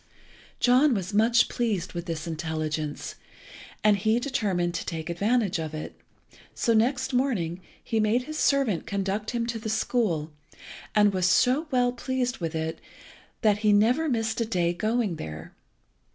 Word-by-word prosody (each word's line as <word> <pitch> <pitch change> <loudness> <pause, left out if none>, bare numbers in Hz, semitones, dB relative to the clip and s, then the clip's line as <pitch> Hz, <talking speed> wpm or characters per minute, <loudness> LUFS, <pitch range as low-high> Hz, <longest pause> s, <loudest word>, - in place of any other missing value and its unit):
John 255 +2 +4
was 190 0 -3
much 230 +3 +4
pleased 210 -7 -2
with 175 +1 -5
this 160 -1 -4
intelligence, 155 -2 -3 0.7
and 210 -1 +5
he 220 +4 +2
determined 205 -10 -1
to 170 - -3
take 160 +1 -4
advantage 205 +1 +1
of 155 -1 -4
it; 155 - -6 0.6
so 230 - +1
next 260 +4 +1
morning 195 -10 0 0.2
he 225 - -1
made 215 +4 +2
his 310 +3 -6
servant 270 - +1
conduct 200 +1 -2
him 235 -1 -1
to 235 -1 -3
the 220 0 -5
school, 210 -8 0 0.6
and 210 -1 +5
was 185 -1 +2
so 260 - +3
well 250 -3 +2
pleased 250 0 -2
with 165 -2 -3
it 160 0 -3 0.6
that 210 -2 +3
he 210 -1 +3
never 240 +10 +3
missed 225 -2 -1
a - - +1
day 175 -6 0
going 215 -1 -1
there. 80 - -8
215 Hz, 155 wpm, -26 LUFS, 175-245 Hz, 0.7 s, and